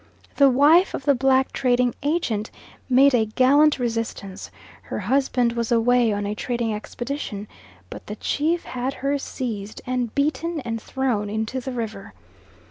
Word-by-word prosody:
The 280 -1 +6
wife 295 +8 +5
of 265 - -7
the 285 - +5
black 265 0 +2
trading 250 -2 +1
agent 275 -9 -1 0.4
made 270 +2 +5
a 225 -3 +3
gallant 275 +7 +4
resistance, 230 -5 -4 0.3
her - - -6
husband 245 +1 +1
was 235 -1 -2
away 240 0 +3
on 205 0 -2
a 205 - -2
trading 235 0 -2
expedition, 215 -1 -5 0.4
but - - -9
the 210 - -5
chief 320 +9 -1
had 255 +2 -4
her 280 +1 -1
seized 220 -7 -5
and 250 -2 -2
beaten, 310 +3 0
and 230 -3 -4
thrown 245 -6 -1
into 220 +4 -2
the 260 +1 -5
river. 220 -5 -6
245 Hz, 150 wpm, -23 LUFS, 220-275 Hz, 0.4 s, The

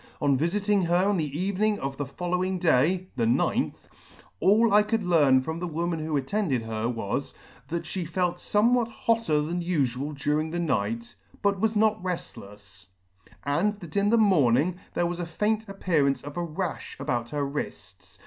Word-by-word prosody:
On 140 -2 +3
vifiting 195 +6 +1
her 175 +2 +3
on 205 -1 +2
the 150 -2 -2
evening 200 +3 +1
of 135 -4 -4
the 145 -1 -4
following 180 +5 -2
day 175 +3 +2
(the 115 -2 +2
ninth), 120 - 0 0.5
all 220 +2 +4
I 210 - +7
could 210 +1 -1
learn 145 -7 +4
from 160 +5 -4
the 180 - -3
woman 170 +1 -2
who 155 -1 -1
attended 140 - -1
her 110 +1 -2
was, 115 +3 -3 0.3
that 170 +3 -3
fhe 180 -4 -4
felt 180 0 0
fornewhat 235 +3 +2
hotter 225 -9 +1
than 175 +3 -2
ufual 145 -4 -1
during 150 +3 0
the 170 - -3
night, 115 -7 -1 0.3
but 200 -1 +2
was 220 +2 +1
not 215 -1 +2
reftlefs; 105 - -7 0.6
and 195 +9 0
that 170 -5 -11
in 200 0 +3
the 230 - +4
morning 175 - +3 0.2
there 175 - +1
was 175 0 -3
the 175 - -2
faint 215 +4 -1
appearance 160 -8 +1
of 145 0 -8
a - - -3
rafh 170 +1 -5
about 120 -1 -2
her 145 +1 -1
wrifts. 140 +2 -7
170 Hz, 175 wpm, -26 LUFS, 140-200 Hz, 0.6 s, I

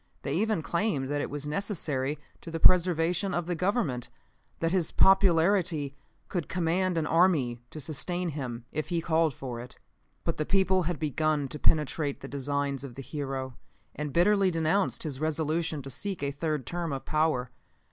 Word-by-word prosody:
They 140 - -1
even 205 0 +1
claimed 170 -7 0
that 145 0 0
it - - -3
was 145 0 -5
necessary 150 -5 -2 0.2
to - - -8
the 165 0 -3
preservation 175 +1 +4
of 175 -1 -1
the 175 - -1
Government; 165 - 0 0.5
that 165 0 +1
his 180 -4 +1
popularity 175 -5 +4 0.3
could 175 -5 -3
command 180 +1 +1
an 160 - +1
army 155 -8 +3
to 155 - -8
sustain 175 +5 -2
him 125 -6 -5
if 155 0 -3
he 170 -2 +1
called 160 -1 +2
for 125 -2 -6
it. 125 +1 -10 0.5
"But 165 - -1
the 155 - 0
people 190 -1 +3
had 175 - -2
begun 155 0 0
to 150 - -6
penetrate 150 -1 +1
the 135 - -6
designs 140 0 -2
of 130 -4 -8
the 135 - -7
hero, 135 -3 -4 0.4
and 150 -1 -4
bitterly 195 +4 +4
denounced 165 +3 +1
his 145 -5 -4
resolution 155 0 -1
to 135 - -7
seek 190 - -4
a 140 - 0
third 150 -2 -2
term 170 +1 -3
of 135 -1 -4
power. 150 -5 +1
155 Hz, 175 wpm, -29 LUFS, 140-175 Hz, 0.5 s, preservation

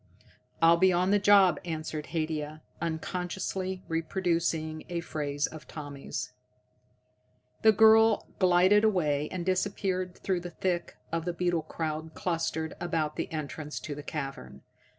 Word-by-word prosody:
"I'll 165 +1 +7
be 185 +2 +5
on 180 +2 +2
the 205 - +4
job," 195 -5 +6
answered 155 -2 -4
Haidia, 155 -2 -3 0.2
unconsciously 180 +3 -3
reproducing 165 -2 -1
a 175 -1 -2
phrase 145 -3 -2
of 155 -1 -9
Tommy's. 145 -3 -6 1.3
The 220 - +7
girl 220 +1 +6
glided 185 +3 +5
away, 150 -9 +1
and 180 -2 -4
disappeared 185 -1 -1
through 185 -2 -1
the 175 0 -7
thick 175 0 -2
of 165 0 -2
the 175 - -1
beetle 175 -1 0
crowd 160 0 -4
clustered 165 -2 -2
about 160 -3 -1
the - - -4
entrance 150 -1 -5
to 150 - -5
the 145 - -7
cavern. 135 - -6
170 Hz, 130 wpm, -29 LUFS, 155-185 Hz, 1.3 s, I'll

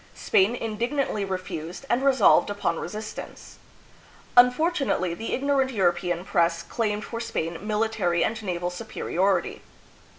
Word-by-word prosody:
Spain 200 +5 +2
indignantly 230 0 -2
refused, 185 - -5
and 245 +1 +1
resolved 265 -8 +5
upon 205 -5 -1
resistance. 215 +4 -8 0.8
Unfortunately, 250 - +3
the 225 +6 -5
igno 280 +1 +1
rant 260 -1 +2
European 175 -4 0
press 170 -1 +1
claimed 210 +2 -2
for 230 - -5
Spain 170 -7 -3
military 210 -5 +1
and 225 0 -2
naval 180 -3 -3
superiority. 195 -1 -1
210 Hz, 120 wpm, -25 LUFS, 175-235 Hz, 0.8 s, resolved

